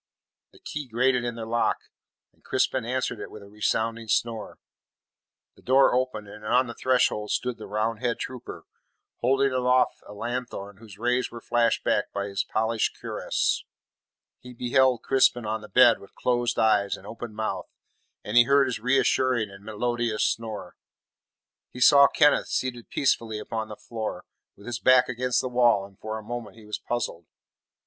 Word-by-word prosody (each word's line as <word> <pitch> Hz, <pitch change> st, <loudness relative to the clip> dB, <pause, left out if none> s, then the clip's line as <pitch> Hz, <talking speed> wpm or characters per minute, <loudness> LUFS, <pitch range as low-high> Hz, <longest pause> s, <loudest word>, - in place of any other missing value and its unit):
The -, -, -20 dB
key 150 Hz, -2 st, -6 dB
grated 125 Hz, +1 st, +1 dB
in 120 Hz, -1 st, -3 dB
the 115 Hz, -1 st, -6 dB
lock, 115 Hz, +1 st, +1 dB, 0.6 s
and -, -, -34 dB
Crispin 130 Hz, -3 st, 0 dB
answered 125 Hz, -1 st, -2 dB
it -, -, -7 dB
with 105 Hz, -, -11 dB
a -, -, -13 dB
resounding 110 Hz, +2 st, -1 dB
snore. 115 Hz, +1 st, -1 dB, 1.0 s
The -, -, -20 dB
door 135 Hz, +1 st, +4 dB
opened, 125 Hz, -4 st, -1 dB
and 105 Hz, +1 st, -12 dB
on 125 Hz, +4 st, +3 dB
the 120 Hz, -, -7 dB
threshold 125 Hz, -5 st, +1 dB
stood 125 Hz, -2 st, -2 dB
the -, -, -8 dB
Roundhead 115 Hz, +3 st, -1 dB
trooper, 130 Hz, -2 st, -7 dB, 0.5 s
holding 135 Hz, +2 st, +2 dB
aloft 125 Hz, 0 st, +2 dB
a -, -, -10 dB
lanthorn 115 Hz, -4 st, -5 dB
whose 105 Hz, -2 st, -13 dB
rays 125 Hz, +2 st, 0 dB
were 120 Hz, -, -9 dB
flashed 120 Hz, 0 st, +1 dB
back 105 Hz, -, 0 dB
by 100 Hz, 0 st, -3 dB
his 100 Hz, -1 st, -2 dB
polished 110 Hz, 0 st, -1 dB
cuirass. -, -, -1 dB, 0.8 s
He 125 Hz, 0 st, -12 dB
beheld 125 Hz, +1 st, +2 dB
Crispin 125 Hz, -3 st, +3 dB
on 110 Hz, +1 st, -2 dB
the 105 Hz, -, -12 dB
bed 120 Hz, -2 st, +6 dB
with 100 Hz, -, -16 dB
closed 120 Hz, -1 st, 0 dB
eyes 105 Hz, -2 st, +2 dB
and 95 Hz, -, -15 dB
open 115 Hz, +1 st, -8 dB
mouth, 105 Hz, -4 st, -3 dB, 0.5 s
and 105 Hz, +3 st, -5 dB
he 120 Hz, 0 st, +8 dB
heard 140 Hz, +1 st, +4 dB
his 130 Hz, -2 st, -3 dB
reassuring 125 Hz, -2 st, +2 dB
and 100 Hz, 0 st, -13 dB
melodious 115 Hz, +1 st, -1 dB
snore. 110 Hz, -5 st, -3 dB, 0.9 s
He 125 Hz, -, -10 dB
saw 140 Hz, +2 st, +8 dB
Kenneth 145 Hz, 0 st, +3 dB
seated 120 Hz, -2 st, -3 dB
peacefully 115 Hz, -5 st, 0 dB
upon 110 Hz, +1 st, -4 dB
the 105 Hz, -, -8 dB
floor, 110 Hz, 0 st, -6 dB, 0.3 s
with 100 Hz, -, -16 dB
his 120 Hz, -1 st, -4 dB
back 130 Hz, 0 st, +5 dB
against 125 Hz, 0 st, 0 dB
the -, -, -3 dB
wall, 120 Hz, -5 st, +3 dB
and 100 Hz, -1 st, -18 dB
for 110 Hz, 0 st, -5 dB
a 110 Hz, -, -8 dB
moment 115 Hz, -2 st, -6 dB
he 110 Hz, -, -14 dB
was 105 Hz, -, -5 dB
puzzled. 115 Hz, -8 st, -4 dB
120 Hz, 170 wpm, -26 LUFS, 110-125 Hz, 1.0 s, he